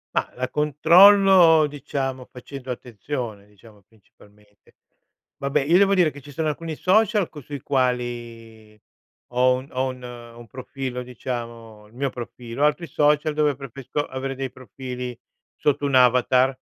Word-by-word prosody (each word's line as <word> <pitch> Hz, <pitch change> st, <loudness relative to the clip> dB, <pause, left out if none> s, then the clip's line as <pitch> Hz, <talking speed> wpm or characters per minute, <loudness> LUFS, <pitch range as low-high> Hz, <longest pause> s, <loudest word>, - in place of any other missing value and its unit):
Mah, -, -, 0 dB
la 130 Hz, +1 st, -2 dB
controllo, 165 Hz, +3 st, +6 dB
diciamo, 135 Hz, -3 st, -4 dB
facendo 130 Hz, +1 st, -10 dB
attenzione, 120 Hz, -3 st, -6 dB
diciamo, 105 Hz, +1 st, -19 dB
principalmente. 105 Hz, 0 st, -25 dB, 0.6 s
Vabbè, 140 Hz, 0 st, 0 dB
io 165 Hz, +5 st, +4 dB
devo 200 Hz, 0 st, +4 dB
dire 175 Hz, -5 st, +3 dB
che 145 Hz, -, -12 dB
ci 145 Hz, -, -14 dB
sono 155 Hz, +3 st, -1 dB
alcuni 160 Hz, +1 st, -5 dB
social 210 Hz, +2 st, +2 dB
co 150 Hz, -, -11 dB
sui 140 Hz, +1 st, -8 dB
quali 120 Hz, -4 st, -3 dB, 0.5 s
ho 125 Hz, +1 st, +4 dB
un 130 Hz, +2 st, -8 dB
ho 130 Hz, +1 st, -1 dB, 0.5 s
un 120 Hz, -, -11 dB
profilo, 130 Hz, 0 st, -6 dB
diciamo, 115 Hz, -3 st, -7 dB
il 105 Hz, -, -23 dB
mio 140 Hz, +2 st, -1 dB
profilo, 120 Hz, +1 st, -6 dB
altri 150 Hz, +3 st, 0 dB
social 150 Hz, +1 st, +2 dB
dove 150 Hz, -1 st, +1 dB
preferisco 135 Hz, +2 st, -5 dB
avere 135 Hz, +1 st, -5 dB
dei 135 Hz, 0 st, -4 dB
profili 125 Hz, 0 st, -7 dB, 0.4 s
sotto 145 Hz, -1 st, 0 dB
un 140 Hz, -, 0 dB
avatar, 125 Hz, +1 st, +4 dB
130 Hz, 140 wpm, -23 LUFS, 120-150 Hz, 0.6 s, controllo